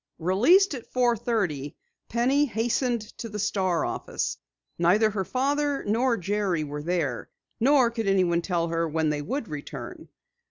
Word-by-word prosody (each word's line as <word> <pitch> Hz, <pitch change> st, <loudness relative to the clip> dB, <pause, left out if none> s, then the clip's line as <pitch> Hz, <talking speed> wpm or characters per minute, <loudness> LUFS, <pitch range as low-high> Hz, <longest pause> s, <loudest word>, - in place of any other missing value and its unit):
Released 250 Hz, -, +4 dB
at 250 Hz, -4 st, -8 dB
four 245 Hz, -2 st, +2 dB
thirty, 190 Hz, -, -2 dB, 0.3 s
Penny 260 Hz, +5 st, +2 dB
hastened 240 Hz, 0 st, 0 dB, 0.2 s
to 230 Hz, -, -5 dB
the 210 Hz, -, -6 dB
Star 190 Hz, -4 st, 0 dB
office. -, -, -3 dB, 0.4 s
Neither 205 Hz, +6 st, +4 dB
her 195 Hz, -2 st, -2 dB
father 280 Hz, +5 st, 0 dB
nor 235 Hz, +3 st, +2 dB
Jerry 195 Hz, -3 st, -1 dB
were 145 Hz, 0 st, -5 dB
there, 155 Hz, -6 st, -2 dB, 0.3 s
nor 255 Hz, -1 st, +4 dB
could 225 Hz, -3 st, -3 dB
anyone 180 Hz, -3 st, +2 dB
tell 170 Hz, -2 st, -1 dB
her 165 Hz, 0 st, 0 dB
when 160 Hz, 0 st, 0 dB
they 150 Hz, -1 st, -1 dB
would 245 Hz, -, -3 dB
return. 150 Hz, -2 st, -8 dB
210 Hz, 150 wpm, -26 LUFS, 170-245 Hz, 0.4 s, Released